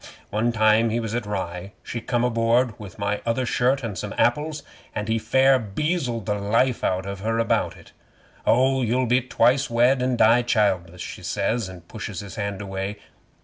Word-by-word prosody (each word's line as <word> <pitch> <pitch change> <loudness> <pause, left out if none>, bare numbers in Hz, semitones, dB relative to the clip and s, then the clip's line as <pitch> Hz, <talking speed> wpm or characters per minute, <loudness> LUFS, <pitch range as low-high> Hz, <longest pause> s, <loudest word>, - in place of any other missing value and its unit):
One 110 +3 +1
time 110 0 +4
we 115 +1 0
was 110 -2 -4
at 120 -3 -2
Rye 95 -1 -4
she 115 - -5
come 120 0 0
aboard 115 0 +2
with 100 -5 -10
my 100 0 -1
other 115 +2 0
shirt 130 +3 +1
and 110 -4 -4
some 100 +3 -5
apples, 150 +4 +1 0.3
and 105 - -3
he 110 0 +1
fair 130 +3 +4
beazled 120 - -2
the 105 - 0
life 115 +5 +1
out 95 0 0
of 100 0 -5
her 115 +3 -1
about 115 - 0
it. - - -17 0.5
'"Oh, 130 +2 +3
you'll 125 +2 +1
be 125 +2 +3
twice 130 +3 +2
wed, 125 +3 +3
and 125 -1 0
die 115 +2 +5
childless," 95 -7 0
she - - -7
says, 100 +3 -1
and 90 -2 -12
pushes 110 -5 -6
his 100 -3 -9
hand 100 -1 -4
away. 95 +1 -4
115 Hz, 190 wpm, -24 LUFS, 100-125 Hz, 0.5 s, die